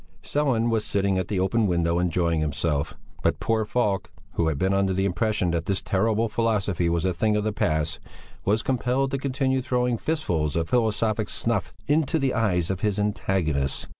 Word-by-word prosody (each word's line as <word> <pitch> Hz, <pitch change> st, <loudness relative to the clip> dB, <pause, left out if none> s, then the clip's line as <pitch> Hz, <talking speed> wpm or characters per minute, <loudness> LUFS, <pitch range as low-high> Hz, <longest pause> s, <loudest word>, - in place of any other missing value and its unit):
Sellén 125 Hz, -6 st, +1 dB
was 110 Hz, -2 st, +1 dB
sitting 100 Hz, -1 st, 0 dB
at 90 Hz, -, -2 dB
the 100 Hz, -3 st, -1 dB
open 105 Hz, +4 st, +2 dB
window 85 Hz, -1 st, +1 dB
enjoying 85 Hz, -2 st, +1 dB
himself; 75 Hz, -1 st, -1 dB, 0.3 s
but -, -, +1 dB
poor 110 Hz, -1 st, +1 dB
Falk, 105 Hz, -4 st, 0 dB, 0.2 s
who 85 Hz, -, +1 dB
had 80 Hz, -3 st, 0 dB
been 95 Hz, +5 st, +1 dB
under 95 Hz, -1 st, +2 dB
the 95 Hz, +1 st, 0 dB
impression 100 Hz, -1 st, 0 dB
that 85 Hz, -1 st, -2 dB
this 100 Hz, -1 st, +1 dB
terrible 110 Hz, +3 st, +1 dB
philosophy 105 Hz, -6 st, 0 dB
was 85 Hz, +1 st, 0 dB
a 95 Hz, -, +1 dB
thing 105 Hz, +5 st, +1 dB
of 105 Hz, -, +1 dB
the 110 Hz, 0 st, -1 dB
past, 80 Hz, -3 st, 0 dB, 0.4 s
was 105 Hz, +3 st, +1 dB
compelled 130 Hz, +1 st, 0 dB
to 135 Hz, -, -1 dB
continue 130 Hz, -1 st, 0 dB
throwing 125 Hz, -2 st, 0 dB
fistfuls 85 Hz, -, -1 dB
of 80 Hz, -1 st, -1 dB
philosophic 110 Hz, -2 st, +1 dB
snuff 115 Hz, -8 st, -1 dB
into 155 Hz, +2 st, +2 dB
the 135 Hz, -4 st, 0 dB
eyes 90 Hz, -6 st, +1 dB
of 95 Hz, -, -3 dB
his 105 Hz, -2 st, 0 dB
antagonists. 95 Hz, -9 st, -1 dB
100 Hz, 185 wpm, -25 LUFS, 85-115 Hz, 0.4 s, open